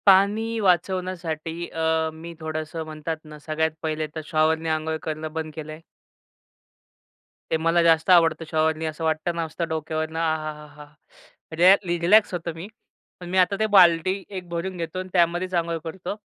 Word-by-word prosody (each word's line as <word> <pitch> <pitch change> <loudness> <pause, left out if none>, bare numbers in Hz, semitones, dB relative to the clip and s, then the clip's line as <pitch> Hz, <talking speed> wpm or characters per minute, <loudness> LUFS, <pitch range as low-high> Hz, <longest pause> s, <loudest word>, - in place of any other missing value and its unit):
पाणी 210 +4 +4
वाचवण्यासाठी 175 -3 -1
अ, 160 0 0
मी 165 +2 -9
थोडंसं 155 0 -4
म्हणतात 155 +1 -5
ना, 150 0 -11
सगळ्यात 160 +1 -1
पहिले 155 -1 -2
तर 160 - -3
शॉवरने 160 +1 +1
अंघोळ 160 0 -1
करणं 155 0 -5
बंद 160 -1 -4
केलं 155 -1 -7
आहे. 155 +1 -10 1.7
ते 160 - +3
मला 165 +2 +2
जास्त 165 +1 +3
आवडतं 165 -2 +5
शॉवरनी 160 0 +1
असं 155 +1 -4
वाटत 160 +1 0
ना, 170 - -1
असतं 165 +1 -4
डोक्यावरनं 160 0 -3
आह! 160 -1 +1 0.2
हा 150 0 -12
हा! 150 0 -11 0.7
रयलॅ 185 +3 +8 0.3
रिलॅक्स 205 +4 +5
होतो 170 -1 -3
मी. 165 +4 -7 0.5
पण 175 -1 -8
मी 185 - -1
आता 185 +2 +4
ते 220 - +3
बाल्टी 175 -1 +6 0.2
एक 180 -1 -7
भरून 175 +2 -4
घेतो 165 +1 -4
आणि 185 0 -6
त्यामध्येच 175 +1 +1
अंघोळ 170 -1 0
करतो, 175 +3 -5
165 Hz, 165 wpm, -24 LUFS, 160-180 Hz, 1.7 s, रयलॅ